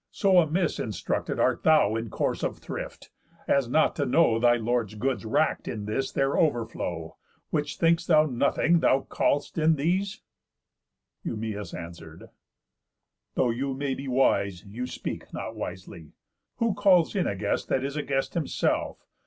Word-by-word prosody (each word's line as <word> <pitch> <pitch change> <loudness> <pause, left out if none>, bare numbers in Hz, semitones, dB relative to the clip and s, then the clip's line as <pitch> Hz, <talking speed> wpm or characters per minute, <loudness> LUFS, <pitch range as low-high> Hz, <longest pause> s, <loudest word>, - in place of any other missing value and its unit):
So 190 -3 +4
amiss 170 +1 +1
instructed 105 -6 -2
Art - - +2
thou 155 -9 +4
in 115 0 -3
course - - -1
of - - -2
thrift, - - -8 0.4
as 135 -4 +2
not 155 +5 +3
to 145 - +1
know 125 -5 +3
Thy 120 0 +5
lord's 115 -2 -1
goods 125 +2 -2
wrack'd 110 - +1
in 105 -2 -4
this 120 +6 -2
their 135 0 +1
overflow? 110 - -1 0.3
Which 150 -2 -1
think'st 165 0 +2
thou 155 -2 +5
nothing, 150 +5 +2
that - - +2
thou 135 - +4
call'st 145 +4 -1
in 160 +1 +4
these?" 185 +7 -1 1.0
Eumæus 105 -4 -4
answer'd: 85 -1 -10 1.0
"Though 125 - +2
you 135 +3 -2
may 140 0 -2
be 135 +1 -6
wise, 100 -8 +1
You 115 +5 -5
speak - - -6
not - - -5
wisely. 85 -3 -8 0.4
Who 230 -3 +1
calls 195 -3 +4
in 190 - +1
a 100 - -1
guest 95 - -2
That 130 - 0
is 140 +1 -3
a 150 - -1
guest 135 -2 -2
himself? 165 -5 -1
135 Hz, 160 wpm, -27 LUFS, 110-155 Hz, 1.0 s, Thy